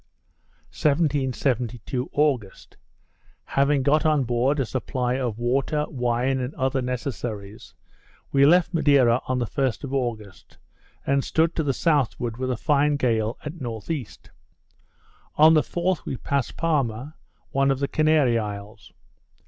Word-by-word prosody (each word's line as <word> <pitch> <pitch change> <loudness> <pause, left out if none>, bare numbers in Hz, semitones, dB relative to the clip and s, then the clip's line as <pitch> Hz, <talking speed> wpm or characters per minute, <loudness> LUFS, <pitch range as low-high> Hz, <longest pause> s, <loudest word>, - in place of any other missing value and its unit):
1772 130 -4 -1
August 135 -10 -1 0.7
Having 140 0 +1
got 150 +3 +3
on 155 -3 +2
board 125 +4 +1
a 135 - +1
supply 125 0 -2
of 125 -4 -2
water, 135 +5 0
wine, 125 -1 0
and 125 +3 -4
other 130 0 0
necessaries, 120 -5 -5 0.6
we 140 0 +4
left 175 +4 +4
Madeira 140 -7 +4
on 130 - 0
the 120 - 0
1st 130 +2 -2
of 140 -1 -5
August, 115 -7 -4 0.5
and 140 0 +1
stood 165 +1 +1
to - - 0
the 145 -3 0
southward 130 -6 0
with 130 0 -3
a 125 - -1
fine 145 +3 +2
gale 115 -4 0
at 150 - -4
N.E. 120 +3 -4 1.3
On 155 +2 +7
the 155 - +5
4th 175 +2 -2
we 130 - -4
passed 140 -1 -2
Palma, 140 -4 -1 0.4
one 135 0 +2
of 135 - +2
the 140 +1 -1
Canary 155 -6 +3
isles. 105 0 -7
130 Hz, 135 wpm, -24 LUFS, 120-145 Hz, 1.3 s, On